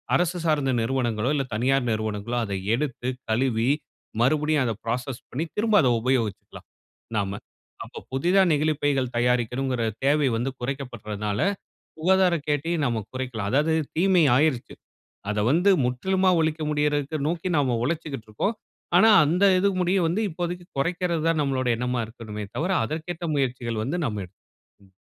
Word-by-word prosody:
அரசு 175 0 +1
சார்ந்த 145 -4 +2
நிறுவனங்களோ! 120 -2 0
இல்ல 135 - 0
தனியார் 130 +2 +1
நிறுவனங்களோ! 110 +2 -2
அத 100 - -5 0.2
எடுத்து 130 -2 -3 0.2
கழுவி 120 +1 +1 0.5
மறுபடியும் 150 +2 +2
அத 115 - 0
ப்ராசஸ் 125 +2 -3
பண்ணி, 150 +6 -2
திரும்ப 220 0 +2
அத 130 - +2
உபயோகிச்சிக்கலாம் 120 -5 -2 0.5
நாம. 100 0 -2 0.4
அப்ப - - -10
புதிதா 175 +9 +3
நெகிழிப்பைகள் 145 -4 +1
தயாரிக்கணுங்கிற 125 +1 0 0.2
தேவை 145 +1 +3
வந்து 125 +4 -1
குறைக்கப்பட்றனால, 110 -6 -4 0.6
சுகாதார 185 +1 +3
கேட்டயும் 155 +2 0
நாம 115 -2 -1
குறைக்கலாம். 125 -6 -3
அதாவது 150 +4 +2 0.2
தீமை 180 -2 +4
ஆயிருச்சு. 145 -4 +1 0.6
அத 105 - -1
வந்து 180 +6 +4
முற்றிலுமா 185 +9 +1
ஒழிக்க 160 0 -1
முடியிறதுக்கு 150 0 0
நோக்கி 175 +2 -2
நாம 130 -5 +1
உழச்சிக்கிட்டுருக்கோம். 150 - -3 0.4
ஆனா, 220 +4 +6 0.2
அந்த 180 +7 +3
இது 200 - +3
முடிய 180 +2 +2
வந்து 185 +7 0
இப்போதைக்கு 175 +1 -4
கொறைக்கிறது 170 +1 -1
தான் 160 -2 +1
நம்மளோடைய 130 -4 0
எண்ணமா 125 0 -1
இருக்கணுமே 110 -3 -7
தவிர, 175 +5 -1
அதற்கேற்ற 160 +4 -5
முயற்சிகள் 120 -4 -1
வந்து 150 +9 -2
நம்ம 105 -2 -3
எடுத்து 90 +2 -23 0.5
ம். - - -27
135 Hz, 135 wpm, -25 LUFS, 120-160 Hz, 0.6 s, ஆனா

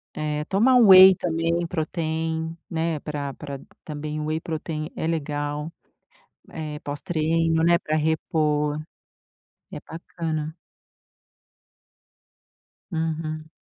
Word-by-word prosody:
eh, 150 0 -2
tomar 230 +9 +3
um 235 -4 +7
whey 190 0 +10
também 170 0 0
protein, 160 -1 -2
né, 165 -2 -1
pra 145 -2 -4
pra 140 -2 -7 0.2
também 150 0 -5
o 150 - -3
whey 155 +1 -1
protein 155 -1 -4
é 160 - -2
legal, 150 -1 -2 0.8
eh, 150 -2 -5
pós 145 0 -6
treino, 165 0 +1
né, 170 0 +5
para 155 - -2
repor 150 -1 +1 1.0
é - - -6
bacana. 160 -1 -5 2.4
Uhum. 160 -1 -3
160 Hz, 105 wpm, -24 LUFS, 150-165 Hz, 2.4 s, whey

